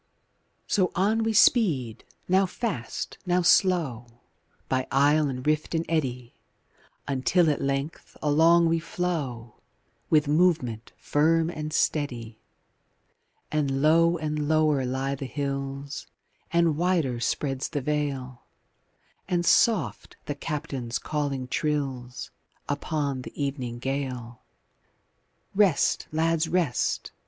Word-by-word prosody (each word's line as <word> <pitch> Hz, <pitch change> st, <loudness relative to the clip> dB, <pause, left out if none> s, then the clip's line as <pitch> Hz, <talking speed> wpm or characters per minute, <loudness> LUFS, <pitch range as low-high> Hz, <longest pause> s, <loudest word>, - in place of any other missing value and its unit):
VI -, -, -45 dB
So 185 Hz, -4 st, +1 dB
on 210 Hz, +5 st, +2 dB
we 225 Hz, 0 st, +1 dB
speed; 170 Hz, -, +3 dB, 0.2 s
now 190 Hz, +1 st, +3 dB
fast, 175 Hz, -, -4 dB
now 180 Hz, 0 st, +2 dB
slow; 170 Hz, -, +3 dB, 0.6 s
By 130 Hz, 0 st, -1 dB
isle 145 Hz, +2 st, +3 dB
and 125 Hz, -1 st, -5 dB
rift 155 Hz, +2 st, 0 dB
and 165 Hz, +1 st, 0 dB
eddy 125 Hz, -7 st, -2 dB, 0.7 s
Until 150 Hz, +5 st, +2 dB
at 145 Hz, -, -3 dB
length 140 Hz, +3 st, -3 dB
along 165 Hz, +3 st, +4 dB
we 165 Hz, 0 st, +2 dB
flow 150 Hz, -10 st, -4 dB, 0.5 s
With 150 Hz, -2 st, +3 dB
movement 150 Hz, -8 st, +1 dB
firm 165 Hz, +3 st, +2 dB
and 155 Hz, -2 st, -5 dB
steady; 120 Hz, -9 st, -1 dB, 1.1 s
And 140 Hz, -3 st, 0 dB
low 165 Hz, +2 st, +4 dB
and 150 Hz, -2 st, -2 dB
lower 155 Hz, -3 st, +2 dB
lie 135 Hz, +2 st, -1 dB
the 135 Hz, -1 st, -5 dB
hills, 140 Hz, 0 st, -4 dB, 0.4 s
And 170 Hz, -3 st, +2 dB
wider 165 Hz, -8 st, +1 dB
spreads 135 Hz, +2 st, -2 dB
the 145 Hz, -3 st, -2 dB
vale, 135 Hz, -3 st, -2 dB, 0.9 s
And 175 Hz, -2 st, 0 dB
soft 190 Hz, -, +2 dB
the 145 Hz, -, -2 dB
Captain's 140 Hz, -5 st, -4 dB
calling 140 Hz, -4 st, -3 dB
trills 135 Hz, -4 st, -3 dB, 0.4 s
Upon 145 Hz, -2 st, -2 dB
the -, -, -11 dB
evening 130 Hz, -4 st, -3 dB
gale: 125 Hz, -2 st, -4 dB, 1.1 s
Rest, 195 Hz, -7 st, +2 dB
lads, 160 Hz, +1 st, +1 dB
rest! 165 Hz, -8 st, 0 dB
150 Hz, 110 wpm, -26 LUFS, 130-165 Hz, 1.1 s, along